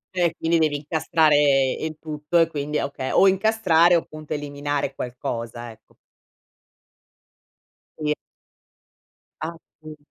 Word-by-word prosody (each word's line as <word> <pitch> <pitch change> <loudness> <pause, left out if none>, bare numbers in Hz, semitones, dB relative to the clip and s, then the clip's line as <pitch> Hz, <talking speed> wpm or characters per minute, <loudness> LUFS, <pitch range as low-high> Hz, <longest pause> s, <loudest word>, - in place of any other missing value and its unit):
Cioè, 170 -2 +1
quindi 165 0 +1
devi 155 -2 +2
incastrare 145 -3 +3
il 155 -1 -4
tutto 150 +1 -2
e 165 - +6
quindi 150 -1 -3
okay, 140 -2 -3
o 195 - +5
incastrare 190 -4 +4
o 165 - +3
appunto 155 0 -8
eliminare 145 -1 -3
qualcosa, 120 -1 -5
ecco. 110 - -21 2.0
Sì. 150 -1 0 1.3
Appun 155 -1 -9
150 Hz, 105 wpm, -23 LUFS, 145-165 Hz, 2.0 s, e